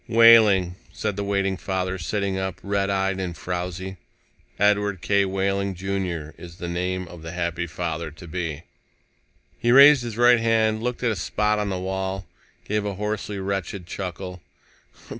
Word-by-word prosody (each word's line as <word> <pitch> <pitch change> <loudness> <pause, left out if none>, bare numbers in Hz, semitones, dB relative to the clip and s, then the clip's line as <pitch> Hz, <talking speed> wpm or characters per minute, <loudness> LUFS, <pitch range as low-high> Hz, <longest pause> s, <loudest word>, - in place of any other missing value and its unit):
"Wehling," 110 -6 +6
said 105 -2 -3
the 100 - -2
waiting 100 -1 0
father, 95 0 -2
sitting 100 +2 -1
up, 95 -1 -3
red 100 0 0
eyed 95 -1 0
and 90 -3 -4
frowzy. 90 +1 -4 0.6
"Edward 100 -1 +2
K. 100 -1 +3
Wehling, 95 0 -1
Jr., 90 -4 -3
is 85 -1 -10
the 85 - -6
name 90 +1 -2
of 85 -1 -11
the 80 +1 -7
happy 85 0 -2
father 80 0 -4
to 80 +4 -13
be." 80 -2 -4 1.0
He 120 - +2
raised 140 +1 +8
his 115 -2 -6
right 120 0 +6
hand, 110 -1 +2
looked 125 +1 -3
at 120 - +2
a - - -1
spot 105 +4 0
on 105 -1 -1
the 95 - -2
wall, 95 +1 -3 0.4
gave 105 0 -1
a 100 -1 -3
hoarsely 105 0 -3
wretched 95 -1 -3
chuckle. 90 0 -6
95 Hz, 160 wpm, -24 LUFS, 90-105 Hz, 1.0 s, raised